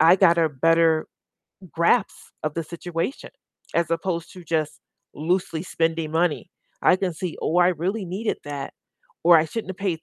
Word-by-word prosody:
I 165 +3 +7
got 170 -3 +5
a 165 - +4
better 160 +2 +3 0.7
grasp 170 +6 +3 0.3
of 155 -1 -2
the 165 - -2
situation 170 - -4 0.4
as 170 0 +1
opposed 165 0 -2
to 180 -2 -12
just 155 -1 -1 0.4
loosely 165 +1 -1
spending 165 -3 -1
money. 165 -1 0 0.3
I 180 - +5
can 185 -2 -2
see, 170 +1 -5
"Oh, 165 - 0
I 180 0 +6
really 185 +5 -1
needed 195 +5 -3
that," 145 -1 -6 0.5
or, 170 0 +8
"I 155 - +1
shouldn't 200 +3 -5
have 190 - -8
paid 180 -5 -2
170 Hz, 170 wpm, -24 LUFS, 160-180 Hz, 0.7 s, or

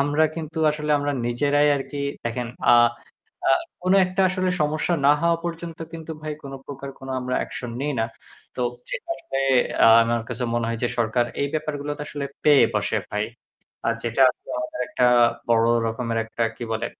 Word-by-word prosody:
আমরা 145 +3 +3
কিন্তু 160 -1 -5
আসলে 150 0 -3
আমরা 145 0 -1
নিজেরাই 145 +4 +2
আরকি 140 +1 -5 0.2
দেখেন 115 +1 -2 0.2
আ - - +9 0.7
আ - - +5 0.3
কোন 185 +1 +2
একটা 185 +1 -2
আসলে 185 0 0
সমস্যা 155 +3 0
না 145 - +8
হওয়া 170 0 +3
পর্যন্ত 170 -1 -5
কিন্তু 160 -1 -7
ভাই 155 0 -3
কোন 140 - -8
প্রকার 140 -1 -7
কোনো 135 0 -6
আমরা 125 0 -2
অ্যাকশন 120 - -5
নেই 145 0 -1
না। 110 - +1 0.5
তো - - -1 0.3
যেটা - - -5
আসলে 135 - -5 0.6
আমার 115 0 0
কাছে 125 0 -3
মনে 120 -1 0
হয় 115 -1 -2
যে 120 - +2
সরকার 115 +1 +2 0.2
এই 140 - 0
ব্যাপারগুলোতে 145 -1 -3
আসলে 145 -1 -4 0.2
পেয়ে 145 -2 +7
বসে - - 0
ভাই। - - -1 0.6
আর 115 - +2
যেটা 115 +3 -1
আরকি - - -6
আমাদের 315 0 -5
একটা 165 -11 +1 0.4
বড় 115 -1 +4 0.2
রকমের 115 0 -2
একটা 115 +1 -4
কি - - -8
বলে 110 - -1
145 Hz, 175 wpm, -24 LUFS, 120-155 Hz, 0.7 s, আ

